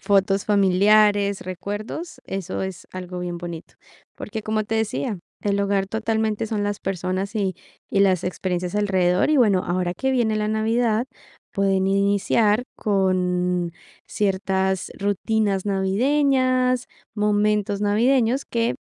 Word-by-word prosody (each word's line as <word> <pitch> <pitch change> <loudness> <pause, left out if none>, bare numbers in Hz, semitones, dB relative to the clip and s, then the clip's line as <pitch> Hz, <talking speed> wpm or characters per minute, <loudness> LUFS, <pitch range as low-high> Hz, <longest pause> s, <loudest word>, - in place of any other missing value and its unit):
fotos 195 -1 +2
familiares, 205 0 +3
recuerdos, 205 - -6
eso 190 -1 -4
es 190 -2 -6
algo 180 -1 -6
bien 175 -1 -4
bonito. 170 -2 -8 0.4
Porque, 220 -3 -6
como 215 0 -1
te 225 - -3
decía, 205 -4 -1 0.2
el 200 -1 0
hogar 200 -1 +1
totalmente 220 0 -1
son 210 -2 -2
las 205 0 -2
personas 190 +2 -3
y 195 -4 0 0.3
y 195 - +1
las 190 -3 +3
experiencias 180 0 -3
alrededor. 190 +1 +2
Y 305 - +4
bueno, 205 -8 +4
ahora 175 0 -1
que 265 +8 -1
viene 235 -4 +1
la 210 0 -1
navidad, 225 +2 +1 0.5
pueden 195 -1 +1
iniciar 205 +3 +2
con 180 -3 0 0.4
ciertas 190 -1 0
rutinas 205 0 0
navideñas, 255 +5 +2 0.3
momentos 210 -1 +1
navideños 235 +5 +2
que 235 0 -1
200 Hz, 125 wpm, -23 LUFS, 190-220 Hz, 0.5 s, Y